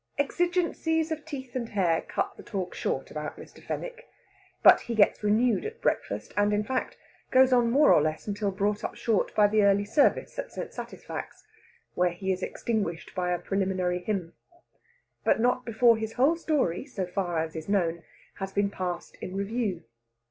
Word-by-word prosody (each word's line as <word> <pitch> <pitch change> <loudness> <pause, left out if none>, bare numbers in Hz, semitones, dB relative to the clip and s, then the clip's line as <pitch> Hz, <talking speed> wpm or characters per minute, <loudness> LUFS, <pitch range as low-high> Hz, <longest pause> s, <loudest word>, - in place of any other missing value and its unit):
Exigencies 325 +1 0
of 310 -1 -4
teeth 270 -5 -7
and 235 -3 -2
hair 175 -5 +1
cut - - -3
the - - -11
talk 190 -4 -4
short - - -3
about - - -5
Mr. - - -13
Fenwick. - - -6 0.5
But - - +9
he 235 - -4
gets 210 - +4
renewed 220 +3 +2
at 445 +2 -6
breakfast, - - -2
and, 205 0 +3
in 210 0 +1
fact, 255 +4 -3 0.3
goes 260 0 +5
on 240 -2 +4
more 285 +5 +6
or - - +5
less 155 +1 -2
until 205 0 -1
brought 205 +2 -1
up - - -4
short 225 -4 0
by 210 - +6
the 210 +1 +3
early 200 0 +4
service 295 - +2
at - - -5
St. - - -6
Satisfax, - - -7 0.5
when 180 -1 +1
he 190 +2 -2
is 185 0 -2
extinguished 200 -6 -3
by 180 -1 -1
a 180 - +1
preliminary 185 -2 -1
hymn. 180 -3 -3 0.9
But - - +3
not 250 +2 +1
before 230 0 +4
his 220 0 -4
whole 275 +7 +3
story, 295 - 0
so 195 -9 -3
far 180 -2 -2
as 160 0 -2
is 160 +3 -6
known, 170 -4 +1 0.4
has 195 0 -4
been 200 0 +1
passed 180 -3 -5
in 185 - -6
review. 200 -2 -2
205 Hz, 180 wpm, -28 LUFS, 185-250 Hz, 0.9 s, But